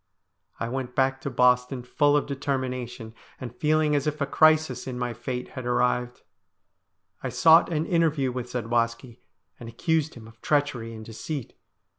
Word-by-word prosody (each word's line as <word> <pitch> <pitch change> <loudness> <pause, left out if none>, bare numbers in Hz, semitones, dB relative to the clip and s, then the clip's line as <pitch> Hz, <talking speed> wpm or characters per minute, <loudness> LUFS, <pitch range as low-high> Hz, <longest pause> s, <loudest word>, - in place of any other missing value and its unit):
I 115 - -2
went 125 0 -4
back 135 0 +1
to 140 - -3
Boston 125 0 +2
full 145 +3 +2
of 145 - 0
determination, 130 -4 -4 0.3
and 120 -2 -7
feeling 155 0 +2
as 145 0 0
if 150 0 -2
a 140 - +1
crisis 155 -2 +3
in 125 -1 -4
my 125 -1 -2
fate 125 +2 -5
had 130 - -7
arrived. 125 0 0 1.0
I - - -3
sought 165 +1 +5
an 155 0 0
interview 160 -7 +1
with 125 0 -5
Zadwaski, 115 0 -2 0.4
and 115 - -8
accused 160 +6 -1
him 115 -2 -11
of 115 0 -18
treachery 130 -6 0
and 110 0 -9
deceit. 115 +4 -6
130 Hz, 160 wpm, -26 LUFS, 120-145 Hz, 1.0 s, sought